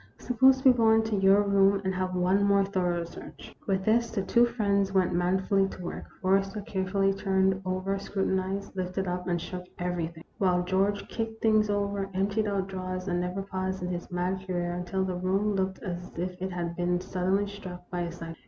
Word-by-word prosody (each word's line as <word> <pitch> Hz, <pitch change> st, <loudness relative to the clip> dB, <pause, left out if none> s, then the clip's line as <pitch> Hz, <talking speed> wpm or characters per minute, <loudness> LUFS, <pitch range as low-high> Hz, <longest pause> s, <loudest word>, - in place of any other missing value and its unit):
Suppose 260 Hz, +2 st, +3 dB
we 260 Hz, -, +10 dB
go 230 Hz, -2 st, +3 dB
into 220 Hz, -1 st, +2 dB
your 195 Hz, +1 st, +5 dB
room, 200 Hz, 0 st, +4 dB
and 190 Hz, -, 0 dB
have 185 Hz, 0 st, -2 dB
one 185 Hz, +3 st, +2 dB
more 200 Hz, -1 st, +4 dB
thorough 180 Hz, -3 st, 0 dB
search? 170 Hz, -, -11 dB
" -, -, -27 dB
With 190 Hz, -1 st, 0 dB
this 230 Hz, +2 st, +3 dB
the 210 Hz, -4 st, -2 dB
two 235 Hz, +5 st, +4 dB
friends 200 Hz, -4 st, +1 dB
went 190 Hz, -2 st, +2 dB
manfully 190 Hz, +2 st, +2 dB
to 195 Hz, -, -9 dB
work. 175 Hz, -, -5 dB, 0.2 s
Forrester 195 Hz, +2 st, +1 dB
carefully 195 Hz, 0 st, 0 dB
turned 190 Hz, -1 st, +1 dB
over, 185 Hz, +1 st, -1 dB
scrutinized, 195 Hz, 0 st, -2 dB
lifted 185 Hz, +1 st, -2 dB
up, 180 Hz, 0 st, -3 dB
and 175 Hz, -1 st, 0 dB
shook 180 Hz, +1 st, -6 dB
everything; 170 Hz, -2 st, -3 dB, 0.2 s
while 180 Hz, -2 st, +2 dB
George 195 Hz, +3 st, 0 dB
kicked 225 Hz, -1 st, -4 dB
things 215 Hz, -1 st, +4 dB
over, 200 Hz, -1 st, -1 dB
emptied 200 Hz, +3 st, +1 dB
out 200 Hz, -2 st, 0 dB
drawers, 185 Hz, -1 st, -5 dB
and 175 Hz, -1 st, 0 dB
never 180 Hz, +2 st, -3 dB
paused 190 Hz, -1 st, -3 dB
in 180 Hz, -, -2 dB
his 175 Hz, -1 st, -4 dB
mad 180 Hz, +1 st, -2 dB
career 175 Hz, -1 st, -1 dB
until 180 Hz, +2 st, -2 dB
the 185 Hz, -, -2 dB
room 190 Hz, +4 st, 0 dB
looked 190 Hz, -1 st, -2 dB
as 175 Hz, -2 st, -5 dB
if 180 Hz, +1 st, -4 dB
it 190 Hz, 0 st, -2 dB
had 170 Hz, -1 st, -3 dB
been 175 Hz, 0 st, 0 dB
suddenly 185 Hz, +2 st, 0 dB
struck 185 Hz, -3 st, -9 dB
by 175 Hz, -1 st, -2 dB
a 170 Hz, -1 st, -3 dB
cyclone. 165 Hz, -1 st, -8 dB
190 Hz, 200 wpm, -28 LUFS, 180-200 Hz, 0.2 s, we